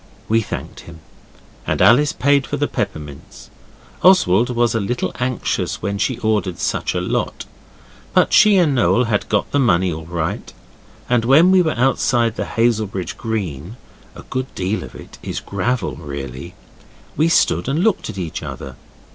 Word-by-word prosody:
We 115 Hz, +1 st, +2 dB
thanked 105 Hz, -, -7 dB
him, 85 Hz, -1 st, -13 dB, 0.7 s
and -, -, 0 dB
Alice 145 Hz, +6 st, +5 dB
paid 140 Hz, -2 st, +2 dB
for -, -, -3 dB
the -, -, 0 dB
peppermints. 75 Hz, -2 st, -6 dB, 0.5 s
Oswald 120 Hz, -, +4 dB
was 120 Hz, -1 st, +1 dB
a 115 Hz, -, 0 dB
little 120 Hz, +4 st, -2 dB
anxious 125 Hz, 0 st, -2 dB
when 100 Hz, 0 st, -2 dB
she 130 Hz, +3 st, 0 dB
ordered 105 Hz, -5 st, 0 dB
such -, -, -2 dB
a -, -, +1 dB
lot, -, -, -3 dB, 0.7 s
but -, -, +3 dB
she 210 Hz, -2 st, +6 dB
and 165 Hz, -6 st, +3 dB
Noel 125 Hz, -1 st, +3 dB
had 110 Hz, -4 st, -1 dB
got 105 Hz, -2 st, 0 dB
the 145 Hz, -, +1 dB
money 95 Hz, -, +2 dB
all 80 Hz, 0 st, -8 dB
right, 85 Hz, -2 st, -4 dB, 0.6 s
and 120 Hz, -2 st, +2 dB
when 150 Hz, +9 st, +5 dB
we 190 Hz, -1 st, +5 dB
were 160 Hz, -3 st, 0 dB
outside 120 Hz, -2 st, +1 dB
on -, -, -2 dB
Hazelbridge 110 Hz, -5 st, -1 dB
Green 100 Hz, -, -4 dB, 0.4 s
(a -, -, -11 dB
good 130 Hz, 0 st, -4 dB
deal 95 Hz, +3 st, -2 dB
of 60 Hz, -, -11 dB
it -, -, -12 dB
is -, -, -4 dB
gravel, 100 Hz, -, -2 dB
really), 70 Hz, +2 st, -7 dB, 0.6 s
we 160 Hz, +2 st, +2 dB
stood 85 Hz, -, +2 dB
and 155 Hz, +6 st, 0 dB
looked 220 Hz, -3 st, +1 dB
at -, -, -7 dB
each 85 Hz, -4 st, -4 dB
other. 65 Hz, -1 st, -8 dB
115 Hz, 165 wpm, -19 LUFS, 90-130 Hz, 0.7 s, she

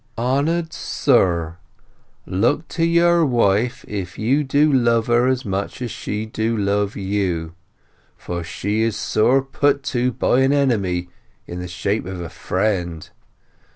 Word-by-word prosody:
Honour'd 145 Hz, +8 st, 0 dB
Sir, 85 Hz, -, +1 dB, 0.7 s
Look 120 Hz, -, 0 dB
to 165 Hz, -, -2 dB
your 170 Hz, 0 st, +4 dB
Wife 120 Hz, -4 st, +1 dB
if 95 Hz, -4 st, -5 dB
you 130 Hz, +7 st, +1 dB
do 145 Hz, +2 st, +2 dB
love 115 Hz, -3 st, +3 dB
her 120 Hz, +1 st, +3 dB
as 130 Hz, -1 st, 0 dB
much 100 Hz, 0 st, -3 dB
as 120 Hz, -3 st, -4 dB
she 105 Hz, +1 st, -4 dB
do 110 Hz, +1 st, -2 dB
love 100 Hz, 0 st, 0 dB
you. 95 Hz, -5 st, -2 dB, 0.6 s
For 85 Hz, -1 st, -5 dB
she 100 Hz, +5 st, -2 dB
is 115 Hz, -1 st, 0 dB
sore 130 Hz, +5 st, +2 dB
put 140 Hz, +1 st, +1 dB
to 125 Hz, 0 st, +1 dB
by 125 Hz, -, +1 dB
an 135 Hz, +1 st, +3 dB
Enemy 100 Hz, -11 st, 0 dB, 0.4 s
in 90 Hz, -, -7 dB
the 90 Hz, -, -5 dB
shape 90 Hz, +4 st, -2 dB
of 95 Hz, -1 st, -6 dB
a 85 Hz, -2 st, -6 dB
Friend. 90 Hz, -4 st, -2 dB
110 Hz, 145 wpm, -21 LUFS, 95-135 Hz, 0.7 s, your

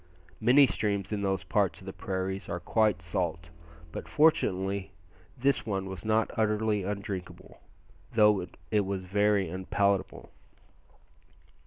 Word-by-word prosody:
Many 130 Hz, +5 st, +6 dB
streams 105 Hz, -4 st, -1 dB
in 105 Hz, -, -2 dB
those 95 Hz, -2 st, -1 dB
parts 100 Hz, 0 st, 0 dB
of 95 Hz, -, -14 dB
the 95 Hz, -, -6 dB
prairies 95 Hz, +1 st, -4 dB
are 85 Hz, -, -2 dB
quite 105 Hz, -1 st, +1 dB
salt, 85 Hz, -1 st, -3 dB, 0.4 s
but -, -, -7 dB
fortunately 100 Hz, -, +2 dB, 0.4 s
this 135 Hz, +2 st, +1 dB
one 95 Hz, -3 st, -2 dB
was 95 Hz, -2 st, -7 dB
not 110 Hz, 0 st, +1 dB
utterly 105 Hz, -1 st, +1 dB
undrinkable, 100 Hz, -2 st, -6 dB, 0.5 s
though 105 Hz, -4 st, +4 dB, 0.3 s
it 105 Hz, -1 st, +3 dB
was 95 Hz, -1 st, -3 dB
very 100 Hz, 0 st, +2 dB
unpalatable. 95 Hz, +3 st, -1 dB
100 Hz, 125 wpm, -29 LUFS, 95-105 Hz, 0.5 s, Many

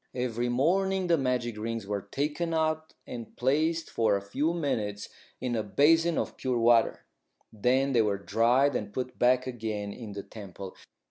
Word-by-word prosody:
Every 120 Hz, -1 st, -1 dB
morning 190 Hz, +9 st, +1 dB
the 170 Hz, -1 st, +3 dB
magic 125 Hz, -4 st, -1 dB
rings 115 Hz, -1 st, -3 dB
were 100 Hz, 0 st, -2 dB
taken 150 Hz, -, -2 dB
out 155 Hz, 0 st, -1 dB
and 115 Hz, -2 st, -8 dB
placed 155 Hz, +6 st, +1 dB
for 110 Hz, -3 st, +2 dB
a 100 Hz, -, -1 dB
few 140 Hz, +11 st, 0 dB
minutes 110 Hz, -11 st, -2 dB, 0.3 s
in 125 Hz, -1 st, -2 dB
a 110 Hz, -, +1 dB
basin 160 Hz, +10 st, +3 dB
of -, -, -2 dB
pure 130 Hz, -2 st, -1 dB
water. 115 Hz, 0 st, +3 dB, 0.5 s
Then 130 Hz, +5 st, +2 dB
they 120 Hz, -, +5 dB
were 105 Hz, -2 st, +1 dB
dried 120 Hz, +7 st, +2 dB
and 105 Hz, -3 st, -3 dB
put 125 Hz, +2 st, -5 dB
back 125 Hz, +1 st, +4 dB
again 110 Hz, -5 st, -4 dB
in 110 Hz, -4 st, -8 dB
the 100 Hz, 0 st, -6 dB
temple. 100 Hz, -3 st, -9 dB
125 Hz, 165 wpm, -28 LUFS, 110-145 Hz, 0.5 s, they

